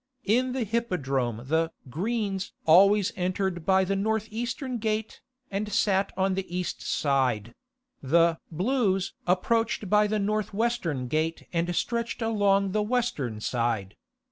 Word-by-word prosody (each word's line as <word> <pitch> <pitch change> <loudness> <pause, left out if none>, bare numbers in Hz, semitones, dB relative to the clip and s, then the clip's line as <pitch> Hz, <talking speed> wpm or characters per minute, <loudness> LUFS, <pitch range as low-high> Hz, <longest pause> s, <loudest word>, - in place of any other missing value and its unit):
In 250 +5 +2
the 260 -2 -1
Hippodrome 140 - -1
the 160 +3 +1 0.2
"Greens" 195 - -2
always 195 +4 +6
entered 185 -2 -2
by 190 0 +5
the 195 +1 0
north 220 +2 0
eastern 240 +2 -3
gate, 215 0 -2 0.3
and 205 +2 -2
sat 195 -1 +2
on 190 0 +2
the 185 -2 -3
east 180 - -3
side; 125 -6 0 0.5
the 165 +4 +3
"Blues" 195 - 0
approached 220 +3 +1
by 210 0 +5
the 215 +1 0
north 210 0 -1
western 200 - -1
gate 155 +4 -1
and 175 +1 0
stretched 235 +2 -1
along 200 -3 +2
the 215 +2 +1
western 210 - -1
side. 115 -5 -1
195 Hz, 135 wpm, -27 LUFS, 165-220 Hz, 0.5 s, always